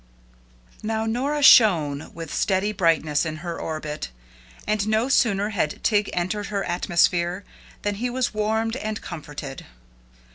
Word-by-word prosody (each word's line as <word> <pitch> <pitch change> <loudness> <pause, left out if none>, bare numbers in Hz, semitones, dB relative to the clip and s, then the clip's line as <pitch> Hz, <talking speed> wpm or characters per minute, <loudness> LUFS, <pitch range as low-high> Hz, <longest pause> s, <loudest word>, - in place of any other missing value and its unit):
Now 220 0 -2
Nora 275 +6 -1
shone 160 - +5
with 165 -2 -7
steady 195 +2 +1
brightness 165 -6 +1
in 155 -2 -3
her 170 -1 -4
orbit, 155 - -4 0.6
and 210 -1 0
no 220 +4 +1
sooner 205 -6 +2
had 180 -8 -2
Tig 210 -2 +2
entered 195 +4 -2
her 200 -2 -2
atmosphere, 175 +1 +1 0.4
than 205 - 0
he 250 - 0
was 250 -1 -1
warmed 220 +2 0
and 215 -3 -4
comforted. 150 -4 -8
200 Hz, 135 wpm, -24 LUFS, 165-220 Hz, 0.6 s, shone